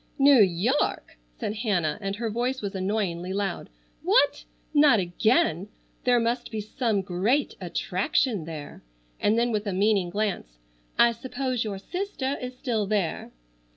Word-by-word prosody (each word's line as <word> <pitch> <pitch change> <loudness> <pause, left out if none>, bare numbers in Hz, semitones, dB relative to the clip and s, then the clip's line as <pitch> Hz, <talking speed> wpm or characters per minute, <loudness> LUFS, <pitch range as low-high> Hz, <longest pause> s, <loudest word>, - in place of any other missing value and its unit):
"New 275 -4 +7
York!" 195 - +1 0.2
said 210 - -3
Hannah, 190 -9 0
and 195 0 -2
her 225 +1 -3
voice 250 +4 -1
was 200 -2 -4
annoyingly 190 -2 -2
loud. 200 -2 -3 0.3
"What! - - +3 0.3
Not 290 -6 +6
again! 180 0 +1 0.4
There 245 -1 +4
must 240 +1 -1
be 220 -2 -4
some 215 -1 -1
great 205 +11 0
attraction 185 - 0
there," 155 -3 -8 0.4
and 215 +2 +2
then 240 +1 +2
with 210 -1 -1
a 200 - -1
meaning 195 -1 +2
glance, 185 - -3 0.4
"I 235 - +6
suppose 255 +1 -3
your 205 -3 -4
sister 285 - -3
is 250 0 -6
still 225 -6 -1
there!" 200 -6 -1
215 Hz, 145 wpm, -26 LUFS, 190-245 Hz, 0.4 s, New